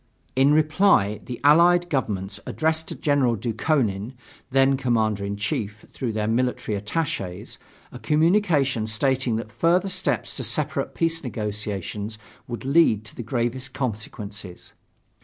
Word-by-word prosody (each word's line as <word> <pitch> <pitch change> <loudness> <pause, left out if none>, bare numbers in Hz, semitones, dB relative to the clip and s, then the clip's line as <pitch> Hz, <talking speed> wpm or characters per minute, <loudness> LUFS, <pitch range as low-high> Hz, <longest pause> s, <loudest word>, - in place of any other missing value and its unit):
In 135 +2 +5
reply 155 - +3
the 125 - -6
Allied 175 +4 +5
Governments 105 - -2
addressed 160 0 0
to - - -5
General 140 -5 +2
Dukhonin, 115 -1 -1 0.4
then 135 +1 +4
commander 110 -6 0
in 100 0 -3
chief, 105 +1 -3
through 125 -3 -3
their 105 -1 -1
military 120 -2 0
attaches, 105 - -3 0.3
a 125 - -9
communication 150 - +2
stating 130 +2 +1
that 110 -1 -4
further 175 +10 +2
steps 190 0 -1
to - - -2
separate - - -1
peace 165 0 0
negotiations 105 -2 -4 0.3
would 120 +1 -6
lead 135 -7 +3
to 110 - -9
the - - -5
gravest 125 +2 -2
consequences. 105 -6 -5
125 Hz, 130 wpm, -24 LUFS, 105-150 Hz, 0.4 s, In